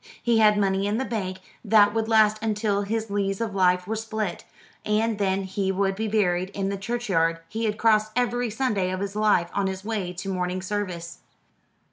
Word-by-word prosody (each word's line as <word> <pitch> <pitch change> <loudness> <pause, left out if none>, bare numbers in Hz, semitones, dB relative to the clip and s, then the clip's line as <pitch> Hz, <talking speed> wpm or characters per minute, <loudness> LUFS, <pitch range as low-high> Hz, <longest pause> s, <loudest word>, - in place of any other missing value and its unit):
He 235 -2 +2
had 210 -1 +5
money 195 -1 +1
in 210 +2 0
the 265 - -1
bank 190 -6 -3 0.3
that 210 -2 +5
would 225 -1 -1
last 215 -1 +4
until 210 -2 0
his 220 +1 -3
lees 195 -1 -1
of 225 -3 -2
life 180 -1 +2
were 220 +4 -2
spilt, 220 -4 -4 0.4
and 215 0 0
then 195 -1 +1
he 190 0 -1
would 195 0 0
be 220 +2 -2
buried 185 -4 +1
in 195 -1 -1
the 200 - -2
churchyard 195 -7 0
he 225 +1 -3
had 210 -1 -1
crossed 215 -1 +3
every 245 -1 0
Sunday 210 -5 0
of 185 0 -3
his 200 +1 -4
life 210 -5 +2
on 200 -1 0
his 190 +1 -5
way 210 -5 -2
to 180 +2 -7
morning 185 -1 -2
service. 180 -4 -4
205 Hz, 195 wpm, -25 LUFS, 190-220 Hz, 0.4 s, had